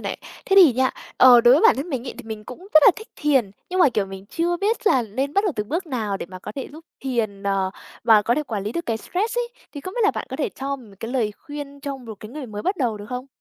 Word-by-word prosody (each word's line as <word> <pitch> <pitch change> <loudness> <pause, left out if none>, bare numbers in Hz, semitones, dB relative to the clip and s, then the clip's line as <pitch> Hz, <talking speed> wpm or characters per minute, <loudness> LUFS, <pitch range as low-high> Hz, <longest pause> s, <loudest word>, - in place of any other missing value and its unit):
này. - - -4 0.3
Thế 390 - +2
thì 340 -10 +9
nha, 260 +2 +2 0.3
ờ, 250 -2 +8
đối 240 +2 +7
với 300 - +3
bản - - +6
thân 280 +6 -4
mình 260 -2 -3
ấy - - -5
thì - - -7
mình 215 -1 -7
cũng 250 - -9 0.2
rất 310 - +8
là - - +10
thích 440 - -10
thiền, 270 -9 +2 0.2
nhưng 370 0 0
mà, 320 - +7
kiểu, 210 -5 -1
mình 195 0 -9
chưa 345 +7 -1
biết 435 +4 -1
là 260 - +4
nên 260 +6 -3
bắt 400 +2 +3
đầu 390 - +1
từ 210 - -1
bước 330 - -3
nào 220 -8 -2
để - - -6
mà 185 +1 -10
có 210 - -8
thể 270 - -6
giúp 320 +1 -12 0.2
thiền, 225 -7 -2
ờ, 195 -1 0 0.3
và 220 -3 +6
có 235 - +2
thể 305 - 0
quản 215 -8 -4
lý 210 - -3
được 340 - -4
cái 225 -1 0
stress 420 - -2
ấy, 480 -1 -1 0.2
thì 285 - -7
không 370 +6 -7
biết 485 - -2
là 415 - +5
bạn - - -5
có 265 - -4
thể 300 - -1
cho 275 +1 -4
mì 245 -5 -15
một 195 - -15
cái 225 - -5
lời 230 -5 0
khuyên 290 -2 -8
cho 280 -1 -4
một 235 -4 -9
cái 215 - -8
người 285 -2 -7
mới 210 -1 -6
bắt 380 +2 0
đầu 240 -8 0
được 205 0 -9
không? 250 +1 -5
260 Hz, 310 wpm, -23 LUFS, 215-305 Hz, 0.3 s, là